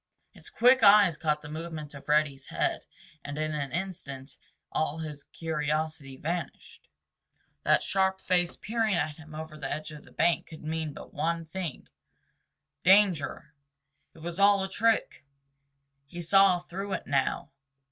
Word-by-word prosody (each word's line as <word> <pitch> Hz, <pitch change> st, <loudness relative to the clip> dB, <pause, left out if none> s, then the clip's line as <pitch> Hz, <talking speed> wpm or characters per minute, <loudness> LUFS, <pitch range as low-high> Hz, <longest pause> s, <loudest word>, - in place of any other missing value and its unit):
His -, -, -14 dB
quick 255 Hz, +2 st, +5 dB
eyes 200 Hz, -4 st, +7 dB
caught 150 Hz, -1 st, -1 dB
the -, -, -8 dB
movement 155 Hz, -1 st, -6 dB
of 140 Hz, 0 st, -12 dB
Reddy's 150 Hz, -3 st, +2 dB
head -, -, -1 dB, 0.4 s
and 145 Hz, +1 st, -6 dB
in 155 Hz, 0 st, -1 dB
an 140 Hz, -3 st, -3 dB
instant 145 Hz, -6 st, -5 dB, 0.4 s
all 155 Hz, 0 st, -1 dB
his 150 Hz, -3 st, -7 dB
curiosity 155 Hz, -3 st, -3 dB
vanished. 170 Hz, 0 st, -5 dB, 0.7 s
That -, -, +3 dB
sharp 190 Hz, 0 st, +1 dB
face 175 Hz, -1 st, +1 dB
peering 220 Hz, -2 st, 0 dB
at 150 Hz, -2 st, -1 dB
him 155 Hz, -1 st, -12 dB
over 155 Hz, 0 st, -7 dB
the 135 Hz, -2 st, -4 dB
edge 155 Hz, +1 st, -4 dB
of 150 Hz, -1 st, -10 dB
the -, -, -18 dB
bank 170 Hz, +1 st, +1 dB
could 160 Hz, -, -11 dB
mean 160 Hz, 0 st, -3 dB
but -, -, -11 dB
one 165 Hz, +2 st, -1 dB
thing—danger! 175 Hz, 0 st, -1 dB, 0.6 s
It -, -, -14 dB
was 175 Hz, +2 st, -5 dB
all 200 Hz, -1 st, +5 dB
a 190 Hz, -, -3 dB
trick! 225 Hz, +2 st, +1 dB, 0.8 s
He 175 Hz, +4 st, -7 dB
saw 195 Hz, +1 st, +5 dB
through 190 Hz, +3 st, -6 dB
it -, -, -3 dB
now. 140 Hz, -2 st, 0 dB
160 Hz, 145 wpm, -29 LUFS, 150-190 Hz, 0.8 s, eyes